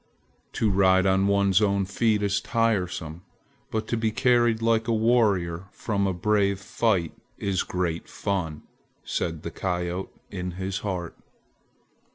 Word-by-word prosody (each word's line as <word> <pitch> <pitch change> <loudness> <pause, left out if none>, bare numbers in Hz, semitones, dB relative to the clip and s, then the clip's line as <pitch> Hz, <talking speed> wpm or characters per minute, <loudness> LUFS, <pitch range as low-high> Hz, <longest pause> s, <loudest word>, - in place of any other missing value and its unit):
"To 110 -2 +1
ride 95 -1 +4
on 95 +1 +3
one's 100 0 +3
own 100 -2 +2
feet 105 +2 +1
is 100 -1 +1
tiresome, 90 -8 -1 0.5
but 110 0 -2
to - - +1
be 110 0 +1
carried 120 -1 +3
like 115 0 +1
a - - +1
warrior 105 -7 +2
from 100 -1 -1
a - - +1
brave 100 +1 +1
fight 95 -4 0 0.2
is 100 -2 0
great 85 -2 -2
fun!" 90 -7 -3 0.4
said 80 -2 -3
the - - -5
coyote 90 0 -3 0.2
in 90 -2 -4
his 95 +2 -3
heart. 90 -5 -4
100 Hz, 140 wpm, -26 LUFS, 90-110 Hz, 0.5 s, ride